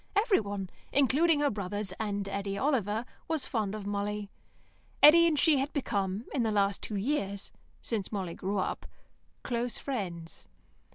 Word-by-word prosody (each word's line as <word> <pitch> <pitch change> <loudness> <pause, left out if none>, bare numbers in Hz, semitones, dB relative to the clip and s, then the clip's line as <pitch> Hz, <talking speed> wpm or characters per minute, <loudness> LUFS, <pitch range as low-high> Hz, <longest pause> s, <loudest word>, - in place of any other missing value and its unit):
Everyone, 205 - +1 0.2
including 290 +4 +3
her 290 - +3
brothers 205 -1 -2
and 205 -2 -2
Eddy 200 0 -3
Oliver, 230 -4 0 0.2
was 320 -3 -1
fond 215 -3 -1
of 210 -2 -6
Molly. 205 0 -3 0.7
Eddy 335 +3 +9
and 315 -3 +1
she 300 -2 +4
had 275 +3 -1
become, 205 -6 -1
in 265 - +1
the 225 - +1
last 200 -1 +1
two 215 - -3
years, 200 -3 -2 0.3
since 215 -5 -3
Molly 190 -5 -3
grew 195 +3 -3
up, 190 - -2 0.6
close 240 0 -2
friends. 175 -11 -5
210 Hz, 150 wpm, -30 LUFS, 200-275 Hz, 0.7 s, Eddy